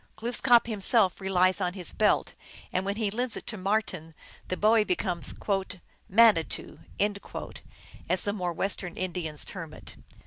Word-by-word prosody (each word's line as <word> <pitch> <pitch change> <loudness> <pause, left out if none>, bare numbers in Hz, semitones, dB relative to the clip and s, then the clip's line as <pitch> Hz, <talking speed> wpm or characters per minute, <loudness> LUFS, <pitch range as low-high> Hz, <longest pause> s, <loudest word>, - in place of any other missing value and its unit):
Glooskap 240 +1 +3
himself 210 -3 +2
relies 185 0 +2
on 180 -1 0
his 180 -3 -3
belt, 210 -1 +2 0.4
and 185 +1 0
when 200 0 -1
he 215 -2 -1
lends 245 +2 +1
it - - -9
to 220 - -2
Marten, 185 -5 -2 0.3
the 185 - -3
boy 215 +1 +4
becomes 180 -3 -2 0.4
" 185 - -23
mani 215 -4 +6
too," - - -3 1.3
as 180 0 +3
the 205 - -1
more 180 -4 -2
Western 180 0 -2
Indians 175 -5 -3
term 165 -5 -7
it. - - -11
190 Hz, 150 wpm, -28 LUFS, 180-215 Hz, 1.3 s, mani